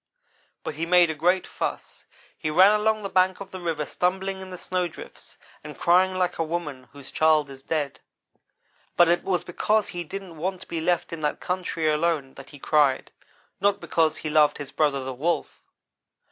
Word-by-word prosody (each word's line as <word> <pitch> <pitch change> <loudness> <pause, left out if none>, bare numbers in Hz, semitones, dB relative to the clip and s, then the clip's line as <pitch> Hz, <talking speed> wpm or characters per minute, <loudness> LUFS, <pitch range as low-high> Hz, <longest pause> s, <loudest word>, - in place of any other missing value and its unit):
but - - -4
he 155 +3 -4
made 175 -1 +5
a - - -3
great 175 +5 +1
fuss. - - -5 0.3
He 155 - -3
ran 185 +6 +6
along 215 0 +1
the - - -2
bank 185 0 +2
of 195 -1 -9
the 185 - -7
river, 165 -4 -2
stumbling 190 +3 -1
in 190 - -9
the 180 - -7
snowdrifts, 180 -2 -5 0.3
and 150 0 -9
crying 185 +2 +3
like 180 -2 -1
a - - +2
woman 150 -6 -5
whose 140 -1 -11
child 155 -2 +3
is 135 -1 -11
dead; 140 -3 -2 1.0
but 175 - +7
it 175 +1 +2
was 185 -2 0
because 210 +4 0
he 175 0 -4
didn't 185 0 -8
want 185 +3 -3
to - - -10
be 165 - -3
left 175 0 0
in 165 - -6
that 150 -1 -1
country 180 -3 -2
alone 150 -3 0
that 135 - -12
he 145 - -12
cried 140 -2 +2 0.5
not 200 +1 +2
because 160 -2 +1
he 155 - -4
loved 150 -1 +4
his 145 -2 -7
brother, 140 -3 +1
the 130 0 -4
Wolf. 155 +4 -2
170 Hz, 190 wpm, -25 LUFS, 150-185 Hz, 1.0 s, but